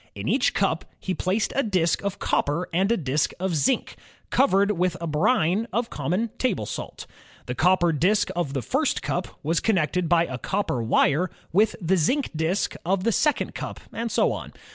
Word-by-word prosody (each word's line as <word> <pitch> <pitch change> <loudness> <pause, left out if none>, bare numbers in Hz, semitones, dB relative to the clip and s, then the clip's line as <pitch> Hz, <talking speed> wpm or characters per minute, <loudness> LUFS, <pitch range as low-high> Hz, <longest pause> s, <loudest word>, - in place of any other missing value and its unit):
In - - -5
each - - +2
cup - - +1 0.2
he 190 - -3
placed 190 +4 -1
a 275 - +3
disk 185 - +1
of 200 -1 -2
copper 150 +5 0
and 190 +5 +2
a 235 - +3
disk 145 -2 0
of 185 -2 -1
zinc, 250 - +1 0.4
covered 200 -6 +3
with 180 -2 0
a 170 - -4
brine 180 +5 +1
of 235 0 -1
common 180 - -1
table 210 - 0
salt. - - -6 0.4
The 125 - -3
copper 175 +5 +3
disk 185 +7 +2
of 170 -6 -2
the 130 - -1
first - - 0
cup - - -2 0.2
was 165 +3 +1
connected 180 -4 +1
by 170 -1 +4
a 130 -4 -6
copper 195 -11 -1
wire 140 +9 +2 0.2
with 210 +5 +3
the 185 0 +1
zinc 260 - +1
disk 160 +5 0
of 185 +2 0
the 230 - +2
second 295 +7 +1
cup, - - -6
and 230 0 -3
so - - +2
on. - - -6
180 Hz, 185 wpm, -25 LUFS, 160-210 Hz, 0.4 s, by